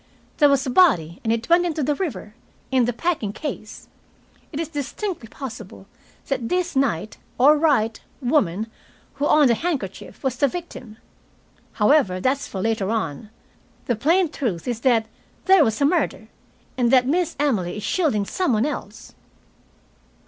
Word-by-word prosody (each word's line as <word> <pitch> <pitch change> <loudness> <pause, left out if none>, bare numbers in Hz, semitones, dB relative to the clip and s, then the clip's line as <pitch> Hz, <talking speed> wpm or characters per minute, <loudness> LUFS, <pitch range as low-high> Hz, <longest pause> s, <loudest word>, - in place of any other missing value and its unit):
"There 295 -2 +5
was 275 -1 +2
a 255 - -2
body, 190 - +3
and 225 - 0
it 230 0 -1
went 345 +1 +4
into 320 -4 -1
the 295 +3 +1
river 255 - -5 0.4
in 255 -2 +3
the 245 - 0
packing 245 - -2
case. 225 -4 -7 0.6
It 300 - -5
is 330 - -2
distinctly 305 - -4
possible 225 -7 -9 0.4
that 255 -4 -2
this 360 -2 -1
Knight 215 -7 0 0.2
or 285 +5 +6
Wright 280 -8 +1 0.2
woman, 225 - +1 0.6
who 290 - +3
owned 295 -5 +5
the - - +5
handkerchief, 260 - -4
was 260 -2 -1
the 280 - +3
victim. 260 -9 -8 0.8
However, 210 -5 +3
that's 265 +7 0
for 190 - -5
later 220 -3 0
on. 215 -2 -3 0.6
The 240 - 0
plain 330 - +2
truth 210 - -3
is, 240 -2 -2
that 235 -3 +2 0.4
there 380 -4 +6
was 220 -4 0
a 280 - +3
murder, 340 +5 0 0.5
and 240 -1 +3
that 250 0 +5
Miss 335 +4 0
Emily 215 -11 0
is 210 - -6
shielding 280 - +1
some 360 - 0
one 220 +3 +2
else." 300 - -6
260 Hz, 160 wpm, -22 LUFS, 220-300 Hz, 0.8 s, or